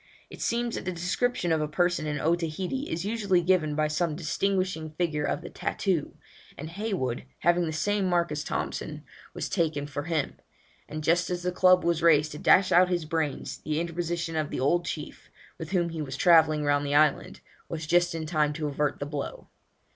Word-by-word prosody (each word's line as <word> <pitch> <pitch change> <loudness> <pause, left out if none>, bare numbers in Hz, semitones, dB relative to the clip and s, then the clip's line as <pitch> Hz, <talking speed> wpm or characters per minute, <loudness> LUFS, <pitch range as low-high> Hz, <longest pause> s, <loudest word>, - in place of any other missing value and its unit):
It - - -10
seems 235 0 0
that - - -4
the 185 - -1
description 180 +2 -1
of 160 -1 +2
a 150 - 0
person 175 0 0
in 145 -1 -2
Otaheite 175 - -1
is 165 +3 -3
usually 200 -5 +1
given 170 -4 +2
by 155 0 +2
some 155 +1 -1
distinguishing 185 0 -1
figure 155 -4 0
of 170 - -2
the 175 - -7
tattoo, 180 -7 -2 0.4
and 155 +3 -7
Heywood, 180 - -2 0.2
having 175 0 +3
the - - -2
same 195 +5 0
marks 170 -2 +1
as 150 0 -2
Thompson, - - -4 0.3
was - - -3
taken 155 -4 0
for 145 0 -5
him; 160 -3 -1 0.5
and 155 0 -5
just 170 +2 +2
as 175 -1 -3
the 180 - 0
club 185 0 +5
was 170 -1 +1
raised 155 -2 +4
to 150 - -7
dash 185 0 +5
out 180 +1 +6
his 175 -3 -1
brains, 155 -2 -2
the 155 0 -2
interposition 170 0 -3
of 155 -2 -1
an - - -3
old 170 +6 +2
chief, 150 -3 -6 0.3
with 160 -1 -6
whom 175 -2 +1
he 165 -1 -5
was 140 -2 -5
travelling 160 -3 +5
round 145 0 +2
the 145 0 -1
island, 150 -1 +2 0.3
was 160 -1 -4
just 175 +1 +2
in 160 -1 -3
time 155 -2 +1
to 155 +1 -4
avert 145 +1 -1
the 145 - -3
blow. 145 -1 -6
165 Hz, 200 wpm, -27 LUFS, 150-180 Hz, 0.5 s, out